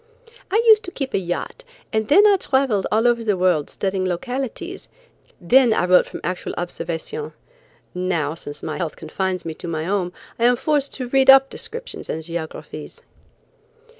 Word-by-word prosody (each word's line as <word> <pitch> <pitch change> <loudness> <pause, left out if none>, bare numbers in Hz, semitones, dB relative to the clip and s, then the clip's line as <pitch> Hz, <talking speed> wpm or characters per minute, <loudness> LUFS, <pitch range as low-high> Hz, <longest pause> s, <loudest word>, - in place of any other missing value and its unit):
"I 440 +4 +2
used 435 -2 +7
to 360 - -6
keep 275 -6 -4
a - - +2
yacht, 180 - -4 0.3
and 220 -1 0
then 390 - +6
I 410 -1 +6
traveled 265 - +1
all 225 +3 +3
over 235 -1 +2
the 210 -4 +1
world 180 -5 +2
studying 190 -1 -2
localities; 245 +8 -4 0.5
then 235 +5 +4
I 175 - +1
wrote 180 0 +5
from - - -8
actual 180 +1 -4
observation. 175 - -5 0.6
Now, 180 -5 -1
since 145 -3 -7
my - - -4
health 170 -4 -3
confines 185 +3 -3
me 165 - -4
to 170 - -9
my 160 -2 -2
home, 185 0 -1 0.3
I 235 - +3
am 245 0 +5
forced 285 +2 0
to 255 -3 -5
read 270 +1 +3
up 270 0 +8
descriptions 480 +1 -7
and 160 - -3
geographies." 165 -1 -7
200 Hz, 170 wpm, -21 LUFS, 175-270 Hz, 0.6 s, up